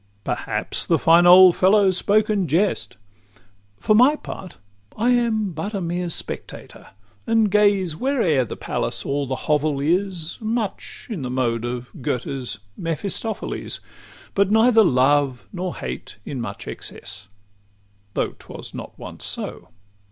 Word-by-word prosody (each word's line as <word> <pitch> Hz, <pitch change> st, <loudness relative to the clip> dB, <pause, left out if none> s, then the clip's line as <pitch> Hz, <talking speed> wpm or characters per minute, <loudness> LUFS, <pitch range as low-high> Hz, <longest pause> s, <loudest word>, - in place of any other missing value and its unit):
Perhaps -, -, -1 dB
the -, -, +3 dB
fine 170 Hz, +2 st, +5 dB
old 180 Hz, 0 st, +9 dB
fellow 195 Hz, +1 st, +4 dB
spoke 205 Hz, +3 st, +2 dB
in 200 Hz, -4 st, 0 dB
jest: 160 Hz, -, 0 dB, 0.8 s
For 215 Hz, -, +3 dB
my 255 Hz, +7 st, +6 dB
part, 190 Hz, -, -9 dB, 0.4 s
I 235 Hz, +4 st, +2 dB
am 225 Hz, -5 st, +1 dB
but 170 Hz, +7 st, -5 dB
a -, -, -1 dB
mere 175 Hz, 0 st, -2 dB
spectator, -, -, -5 dB, 0.4 s
And 225 Hz, -3 st, +3 dB
gaze 200 Hz, -5 st, +3 dB
where'er 190 Hz, -, +1 dB
the 115 Hz, -, -7 dB
palace -, -, -2 dB
or 140 Hz, 0 st, -1 dB
the 130 Hz, -, -2 dB
hovel 150 Hz, -1 st, +1 dB
is, 175 Hz, +2 st, -1 dB
Much 220 Hz, -2 st, -3 dB
in 195 Hz, -9 st, -4 dB
the 125 Hz, -, -4 dB
mode 120 Hz, -2 st, -1 dB
of 125 Hz, 0 st, -5 dB
Goethe's 125 Hz, -1 st, -3 dB, 0.2 s
Mephistopheles; 190 Hz, +6 st, -3 dB
VIII -, -, -22 dB
But 200 Hz, -1 st, +2 dB
neither 225 Hz, +1 st, +5 dB
love 135 Hz, -3 st, +2 dB
nor 185 Hz, -1 st, -4 dB
hate 65 Hz, 0 st, -6 dB
in 135 Hz, -4 st, -4 dB
much 100 Hz, -3 st, -6 dB
excess; 95 Hz, +2 st, -6 dB, 0.9 s
Though -, -, 0 dB
't -, -, -15 dB
was -, -, -9 dB
not -, -, -8 dB
once -, -, -9 dB
so. -, -, -5 dB
180 Hz, 145 wpm, -22 LUFS, 140-210 Hz, 0.9 s, old